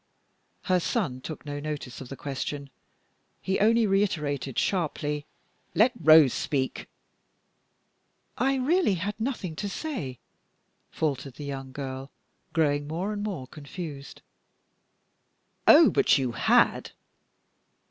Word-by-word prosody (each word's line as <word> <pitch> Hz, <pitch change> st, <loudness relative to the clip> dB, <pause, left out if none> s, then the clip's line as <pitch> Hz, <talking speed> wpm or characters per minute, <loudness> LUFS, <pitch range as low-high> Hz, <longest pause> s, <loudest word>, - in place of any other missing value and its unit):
Her 185 Hz, -1 st, +2 dB
son 170 Hz, -, -1 dB
took 155 Hz, +3 st, -7 dB
no 145 Hz, 0 st, -4 dB
notice 145 Hz, -4 st, -5 dB
of 130 Hz, -, -9 dB
the 135 Hz, -, -6 dB
question. 140 Hz, 0 st, -5 dB, 0.7 s
He 190 Hz, -, -1 dB
only 225 Hz, +2 st, +4 dB
reiterated 150 Hz, -, 0 dB
sharply, 150 Hz, -5 st, -1 dB, 0.5 s
"Let 230 Hz, +4 st, +5 dB
Rose 155 Hz, -3 st, +7 dB
speak." 135 Hz, -3 st, -2 dB, 1.5 s
"I 270 Hz, +1 st, +1 dB
really 270 Hz, -, +2 dB
had 195 Hz, +4 st, -2 dB
nothing 220 Hz, -, -3 dB
to 205 Hz, -, -3 dB
say," 195 Hz, -, -4 dB, 0.7 s
faltered 140 Hz, -4 st, -2 dB
the 145 Hz, -, -7 dB
young 135 Hz, -1 st, -6 dB
girl, 135 Hz, 0 st, -6 dB, 0.4 s
growing 145 Hz, -3 st, +1 dB
more 180 Hz, +7 st, -2 dB
and 205 Hz, -, -4 dB
more 190 Hz, -11 st, -4 dB
confused. 145 Hz, +1 st, -9 dB, 1.4 s
"Oh, -, -, +8 dB
but -, -, +4 dB
you 130 Hz, -3 st, -1 dB
had!" 115 Hz, -, +2 dB
150 Hz, 115 wpm, -27 LUFS, 140-195 Hz, 1.5 s, Oh